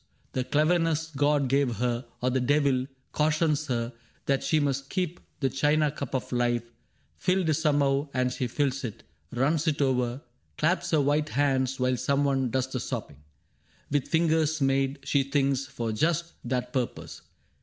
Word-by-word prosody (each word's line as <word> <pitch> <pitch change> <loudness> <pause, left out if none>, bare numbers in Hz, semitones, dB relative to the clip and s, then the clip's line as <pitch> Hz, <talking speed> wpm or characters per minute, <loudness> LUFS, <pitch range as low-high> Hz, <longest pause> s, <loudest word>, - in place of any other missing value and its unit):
The 130 - 0
cleverness 160 +2 +1
God 145 0 +2
gave 135 -2 +2
her 120 +2 -1
— - - -37
or 125 - +2
the 130 - +1
devil 135 -1 +2
— 130 - -43
cautions 155 0 +1
her 120 -1 -2 0.3
That 135 -1 +1
she 155 - +2
must 140 -2 -1
keep 180 -2 -2 0.2
the 135 - +2
china 150 +2 +2
cup 140 -3 -5
of 130 - -3
life 120 -1 +1 0.5
Filled 180 - +1
somehow, 145 -2 +2
and 125 -1 0
she 130 - -2
fills 140 +2 -1
it 115 -5 -6 0.2
— 80 - -40
runs 150 +6 +1
it 150 -2 +1
over 125 -1 0 0.2
— - - -42
Claps 170 +3 +1
her 155 -3 +3
white 150 +2 +1
hands 135 -2 +1
while 125 0 +1
some 140 +3 +1
one 135 -2 +1
does 130 +2 0
the 130 - -2
sopping 115 - -5 0.7
With 145 -2 +1
fingers 160 -1 +2
made, 135 0 +1
she 140 - +2
thinks, 135 -1 0
for 120 -4 -3
just 165 +8 0
that 125 0 -2
purpose. 125 -3 -3
140 Hz, 175 wpm, -27 LUFS, 125-150 Hz, 0.7 s, her